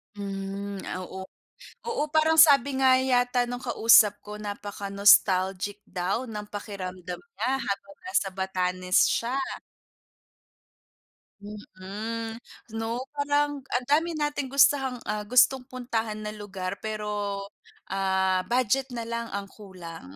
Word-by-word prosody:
Hmm, 195 0 -5 0.2
oo. 190 +1 -7 0.6
Oo 465 -9 -1
parang 315 +1 +4
sabi 280 -3 +6
nga 260 -1 +6
yata 250 -1 +2
nung 245 +1 -5
kausap 225 -4 +5
ko 210 0 -8
napaka-nostalgic 200 -1 +2
daw 190 +8 -2
ng 210 -3 -7
pakiramdam 185 -4 -6
niya 360 - -4
habang 200 0 -4
nasa 365 - 0
Batanes 185 -1 +1
siya. 240 +3 -1 2.1
Mm, 210 +3 -6 0.4
'no? 230 +3 -2
Parang 290 0 0 0.2
ang 250 0 0
dami 325 +2 +2
nating 295 -2 -2
gustahang, 270 -2 +3
ah, 210 -1 -3
gustong 250 +1 +4
puntahan 230 -4 -3
na 210 - -4
lugar 195 -2 -6
pero, 210 -2 -3 0.5
ah, 190 -1 +1
budget 255 +2 +1
na 230 - -3
lang 235 0 -4
ang 200 - -3
kulang, 170 - -11
210 Hz, 115 wpm, -27 LUFS, 195-255 Hz, 2.1 s, sabi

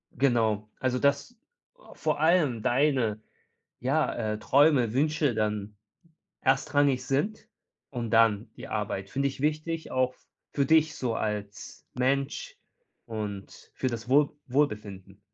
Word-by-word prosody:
Genau. 110 -5 +1
Also, 125 -1 0
dass 140 +11 +1 0.6
vor 155 -2 -1
allem 155 -8 +3
deine, 125 -5 +1 0.6
ja, 140 +5 +1
äh, 110 -2 -2
Träume, 135 -1 +4
Wünsche 150 -1 +1
dann 105 -1 -2 0.6
erstrangig 135 -1 +2
sind 205 - -1 0.4
und 120 -4 -4
dann 115 -1 +3
die - - -9
Arbeit. 100 -2 -3
Finde 140 +1 0
ich 135 - -9
wichtig, 155 +2 -2
auch 130 0 +1
f - - -31 0.3
für 140 - +1
dich 155 +1 +4
so 120 -5 -2
als 105 -2 -5
Mensch 135 +2 -1 0.5
und 105 -3 -7
für 130 - -1
das 120 -1 -6
Wohl 145 +3 +4
Wohlbefinden. 105 -8 -2
130 Hz, 125 wpm, -28 LUFS, 110-145 Hz, 0.6 s, Träume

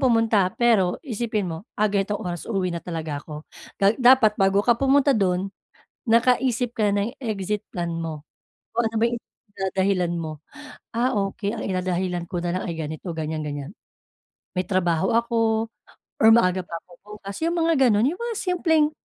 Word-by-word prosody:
pumunta 225 -6 +3
pero 215 -7 +3
isipin 220 -4 -2
mo, 165 -3 -4 0.2
"Ah, 215 - +2
ganitong 200 0 -1
oras 175 +2 -5
uuwi 190 -5 -1
na 170 - -4
talaga 160 -4 -4
ako." 150 0 -9 0.3
Ga 200 +1 +4
dapat 245 -3 +6
bago 195 +1 +3
ka 240 - +5
pumunta 275 +1 +4
dun, 195 -3 0 0.6
nakaisip 245 0 +2
ka 210 -2 +1
na 200 0 +1
ng 240 - -5
exit 210 -3 -2
plan 170 -1 -3
mo, 155 -2 -6 0.5
kung 235 0 +1
ano 225 - -10
ba 235 - +5
yung 235 -1 -4 0.4
idadahilan 190 -2 0
mo. 155 -2 -6 0.5
"Ah, 245 +3 +1
okey 200 +1 -2
ang 220 - -5
idadahilan 180 -2 -1
ko 175 -2 -3
nalang 175 +1 -2
ay 170 - -3
ganito, 155 +3 -5
ganyan-ganyan," 155 0 -4 0.8
may 185 - +1
trabaho 185 -2 +1
ako 225 -1 +1 0.5
or - - +8
maaga 185 -5 +4
pa 170 - -8
ako 180 - -26 0.3
bukas 200 0 -7
yung 340 +1 +1
mga 330 0 +3 0.2
ganun, 215 +3 +3
yung 340 +6 -3
mga 470 -1 -3
simpleng 325 -4 +2
200 Hz, 165 wpm, -24 LUFS, 175-235 Hz, 0.8 s, or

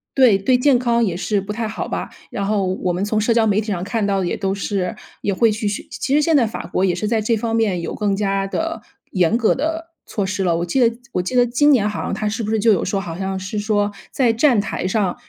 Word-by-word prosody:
对， 250 -7 +6
对 250 +6 +2
健 265 0 +4
康 235 -1 +2
也 185 -6 0
是 200 +3 0
不 195 +2 -5
太 225 0 -2
好 220 - -4
吧。 - - -4 0.2
然 200 - -3
后 205 -1 +1
我 185 0 -1
们 180 +3 -1
从 215 0 0
社 230 +2 +2
交 225 -1 +3
媒 210 0 +2
体 220 - -9
上 185 -4 -2
看 210 +1 -1
到 195 -1 +1
的 185 - -1
也 - - -1
都 195 -1 -1
是 195 -2 -2 0.3
也 200 - 0
会 225 +3 +3
去 210 0 -2
学 205 - -3
其 275 - -1
实 300 - +4
现 320 +1 +2
在 240 -5 +4
法 - - -6
国 185 - -1
也 180 -2 +2
是 210 - -2
在 220 -1 +1
这 225 +1 +1
方 225 +1 -2
面 200 -6 +1
有 - - -4
更 205 -2 0
加 195 -1 0
的 330 +10 -3 0.3
严 185 +4 +2
格 230 - +3
的 320 +4 -3 0.2
措 205 -4 -2
施 190 +1 -2
了。 170 -2 +1
我 170 - -1
记 220 +10 0
得 235 -1 +3
我 180 - 0
记 220 +8 -4
得 245 0 +5
今 270 +5 +3
年 215 -6 +4
好 210 - -3
像 - - -3
它 210 +1 -2
是 220 +3 -2
不 210 - -3
是 220 - +1
就 220 0 +4
有 185 - 0
说， 195 +1 -1
好 170 -4 -6
像 190 0 -3
是 190 +3 -4
说 205 -1 0 0.2
在 240 -4 +2
站 240 -2 +3
台 200 -2 -2
上， 190 -2 0
210 Hz, 300 characters per minute, -20 LUFS, 195-235 Hz, 0.3 s, 对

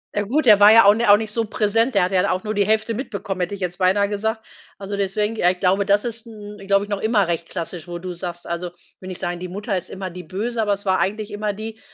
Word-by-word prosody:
Ja 205 - +1
gut, 265 +8 0
er 210 -3 +7
war 210 +2 +8
ja 230 - +8
auch 200 +1 +7
ni 235 +2 0
auch 205 - +8
nicht 215 0 -3
so 230 0 -1
präsent. 225 +3 +1
Der 195 - +4
hat 185 - -1
ja 185 -1 +3
dann 200 - 0
auch 185 - -2
nur 215 0 -3
die 200 -1 +1
Hälfte 220 +1 +1
mitbekommen, 200 -6 -5
hätte 180 +3 -2
ich 195 - -13
jetzt 180 -1 -3
beinahe 200 +2 +2
gesagt. 220 +2 -3 0.3
Also 200 0 -5
deswegen 210 +3 -1
ja 180 - +3
ich 180 - -8
glaube 195 +2 +2
das 200 +1 +3
ist 230 -1 -5
'n 210 -2 -10 0.3
noch 200 -1 -2
immer 215 -4 +2
recht 170 -1 -2
klassisch, 170 0 -6
wo 175 - -5
du 180 +1 -6
sagst, 175 0 -7
also 170 +1 -4 0.3
will 185 - -10
nicht 185 -1 -7
sagen, 175 0 -3
die 180 - -5
Mutter 200 +2 -3
ist 180 - -6
immer 190 -1 -6
die 180 +1 -9
böse, 225 +5 -3
aber 205 -2 +1
es 200 +1 -6
war 190 -1 +2
eigentlich 210 +2 -2
immer 205 0 -2
die, 220 +2 -8
200 Hz, 280 wpm, -21 LUFS, 185-215 Hz, 0.3 s, war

